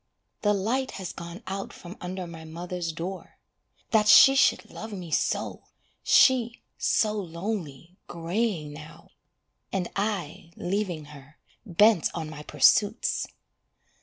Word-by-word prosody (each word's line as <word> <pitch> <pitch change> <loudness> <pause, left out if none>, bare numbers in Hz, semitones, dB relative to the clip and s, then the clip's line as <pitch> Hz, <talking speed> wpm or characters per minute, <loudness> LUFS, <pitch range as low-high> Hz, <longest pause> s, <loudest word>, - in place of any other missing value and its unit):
The 210 -1 +3
light 250 +7 -1
has 190 -2 -5
gone 170 +5 -9
out 195 +1 -5
from 175 +2 -11
under 185 +1 -5
my 165 -1 -9
mother's 170 +1 -5
door. 180 +4 -7 0.5
That 215 -2 +4
she 270 +5 +9
should 275 - +2
love 220 +1 -8
me 180 -5 -7
so, - - -1 0.4
She, 240 -3 +4 0.2
so 215 -1 +2
lonely, 175 -4 -5
greying 170 -2 -2
now, 155 +2 -12 0.6
And 185 -3 -2
I 190 -5 -3
leaving 180 -5 -2
her, 140 +2 -15 0.3
Bent 205 0 +4
on 160 -2 -4
my 150 -1 -8
pursuits! 205 +7 +2
180 Hz, 125 wpm, -27 LUFS, 165-210 Hz, 0.6 s, she